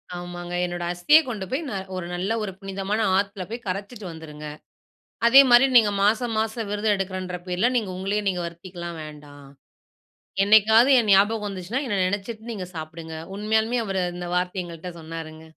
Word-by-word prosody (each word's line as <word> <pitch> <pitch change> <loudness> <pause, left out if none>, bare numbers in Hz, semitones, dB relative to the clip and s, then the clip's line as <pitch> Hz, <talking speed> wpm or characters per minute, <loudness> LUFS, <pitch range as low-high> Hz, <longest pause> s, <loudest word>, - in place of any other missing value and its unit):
ஆமாங்க 175 0 -7
என்னோடய 175 0 -3
அஸ்திய 295 - +6
கொண்டு 205 -5 -4
போய் 275 +5 0
ந - - -5 0.2
ஒரு 185 -2 -4
நல்ல 185 +4 -2
ஒரு 195 - -3
புனிதமான 195 +2 -2 0.2
ஆத்துல 200 -1 -2
போய் 235 0 -7
கரைச்சிட்டு 200 +3 -5
வந்துருங்க. 150 -2 -9 0.8
அதே 265 +4 +9
மாரி 240 +3 +8
நீங்க 215 -3 +6
மாசம் 225 +2 +1
மாசம் 220 -1 -3
விரதம் 210 0 +1
எடுக்கறேன்ற 185 -1 -4
பேர்ல, 180 +6 +1
நீங்க 210 -5 -1
உங்களையே 200 +3 -1
நீங்க 180 -2 -1
வருத்திக்கலாம் 170 0 -8
வேண்டா. 150 -1 -11 1.1
என்னைக்காவது 220 +5 +6
என் 215 -3 0
ஞாபகம் 210 +2 +4
வந்துச்சுனா, 195 +6 -3
என்ன 205 -3 -1
நெனைச்சிட்டு 220 +4 -4
நீங்க 190 -5 -5
சாப்பிடுங்க" 160 +1 -7 0.2
உண்மயாலுமே 220 +3 +1
அவர் 195 -1 -2
அந்த 175 0 -6
வார்த்தை 180 +1 -1
எங்கள்ட்ட 170 +1 -8
சொன்னாருங்க. 160 0 -8
195 Hz, 160 wpm, -24 LUFS, 175-220 Hz, 1.1 s, அதே